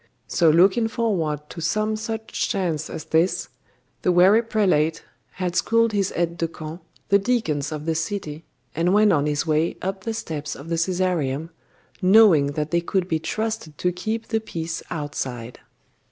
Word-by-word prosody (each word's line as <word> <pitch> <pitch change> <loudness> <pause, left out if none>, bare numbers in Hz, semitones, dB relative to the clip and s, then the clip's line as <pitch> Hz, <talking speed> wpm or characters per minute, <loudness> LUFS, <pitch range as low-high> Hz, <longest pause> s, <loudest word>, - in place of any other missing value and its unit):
So 170 -3 +3
looking 190 +8 +4
forward 165 -11 -1
to 165 - -7
some 215 +6 0
such 220 0 -3
chance 170 -7 -1
as 160 - -6
this, 165 +4 +1 0.5
the 180 - +2
wary 185 +5 +6
prelate 180 -9 +1 0.3
had 180 -2 -3
schooled 230 +2 +3
his 200 -2 0
aides 170 0 -1
de 165 - 0
camp, 160 +1 -8 0.3
the 200 - +5
deacons 165 - -1
of 155 -1 -5
the 165 - +1
city, 160 -2 -4 0.3
and 175 +5 +2
went 210 -2 +5
on 145 -2 +2
his 150 +2 0
way 155 +1 +1
up 190 0 -4
the 225 +2 -3
steps 150 -7 -5
of 145 +4 -10
the 165 - 0
Caesareum, 165 -4 -1 0.5
knowing 185 -8 +6
that 150 +1 -3
they 170 0 +2
could 180 +1 -1
be 160 -3 0
trusted 215 -3 -3
to 180 - 0
keep 220 +6 -4
the 225 - +1
peace 165 -6 -5
outside. 130 -6 -5
170 Hz, 170 wpm, -23 LUFS, 155-205 Hz, 0.5 s, wary